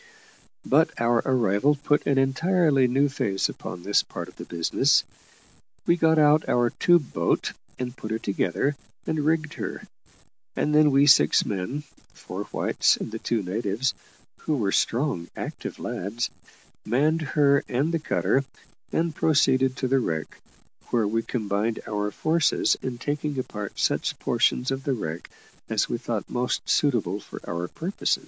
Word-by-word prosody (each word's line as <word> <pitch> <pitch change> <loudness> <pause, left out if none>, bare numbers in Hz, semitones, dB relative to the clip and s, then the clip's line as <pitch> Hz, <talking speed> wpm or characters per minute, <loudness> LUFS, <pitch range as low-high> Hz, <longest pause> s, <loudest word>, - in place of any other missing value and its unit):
But - - +2
our 115 0 +3
arrival 125 +2 +3
put 145 +1 0
an 140 - +2
entirely 140 0 +3
new 135 +4 +2
phase 100 -8 -1
upon 85 - -7
this 100 +2 +3
part - - -7
of - - -14
the - - -8
business. 85 -1 +2 0.8
We 170 - +4
got 160 -1 +3
out 150 0 +4
our 120 -1 +2
tube 175 -7 +2
boat, 85 +1 0 0.3
and 125 0 -4
put 110 - -7
her 110 - -1
together 105 +6 -1 0.3
and 160 - -1
rigged 155 0 0
her; - - -5 0.7
and 150 - 0
then 150 0 +6
we 140 0 +4
six 140 - +5
men 105 +9 -3 0.3
four - - -7
whites - - +1
and - - -6
the 115 - -5
two 110 -2 -1
natives, 105 +6 -1 0.5
who 155 - -1
were 100 -5 0
strong, 120 - 0
active - - -6
lads 110 +6 -3 0.5
manned 150 +8 +1 0.2
her 140 -1 +4
and 140 +7 0
the 165 - +1
cutter, 140 -2 +1 0.5
and 165 -1 0
proceeded 135 -4 +3
to 130 - -1
the 135 +1 +3
wreck, 80 -9 -4 0.5
where 115 -3 +1
we 115 +2 0
combined 110 -1 -2
our 105 -1 -1
forces 160 +7 +2
in 130 -2 -4
taking 145 +2 -3
apart 105 -6 -5
such - - 0
portions 125 +2 +1
of 135 0 -3
the 140 - 0
wreck 80 -8 -5 0.4
as - - +1
we - - -3
thought - - -3
most 125 +1 -2
suitable 105 -9 +1
for - - -10
our 85 +1 -3
purpose. 180 - -1
130 Hz, 155 wpm, -25 LUFS, 105-150 Hz, 0.8 s, then